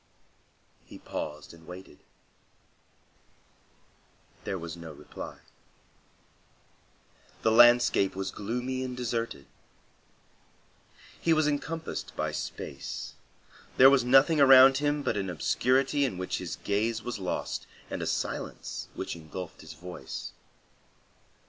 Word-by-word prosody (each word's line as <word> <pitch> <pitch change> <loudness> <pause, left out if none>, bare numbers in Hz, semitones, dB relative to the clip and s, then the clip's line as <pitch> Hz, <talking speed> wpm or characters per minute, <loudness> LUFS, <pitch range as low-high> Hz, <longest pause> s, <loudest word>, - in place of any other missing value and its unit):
He - - -12
paused 75 +1 -6
and 80 -1 -16
waited. 90 +1 -11 2.5
There 95 - -2
was 85 -1 -6
no 85 -2 -9
reply. 75 - -9 2.1
The 110 - +4
landscape 120 -4 +6
was 95 0 -3
gloomy 125 +5 -3
and 125 -1 -5
deserted. 115 - -3 1.7
He 165 - +3
was 155 -1 +3
encompassed 160 +2 -3
by - - -1
space. 70 - -6 0.6
There 135 +1 +9
was 135 -3 +4
nothing 135 +5 +5
around 135 0 +8
him 145 0 0
but 120 -5 0
an 95 -2 -2
obscurity 130 - +1
in 125 -10 -1
which 95 0 -3
his - - -5
gaze 110 +3 -1
was 125 -3 -4
lost, 95 -2 -3 0.2
and - - -5
a - - -2
silence - - -4
which - - -4
engulfed 85 +1 -8
his 80 0 -10
voice. 90 +3 -8
115 Hz, 110 wpm, -29 LUFS, 90-135 Hz, 2.5 s, There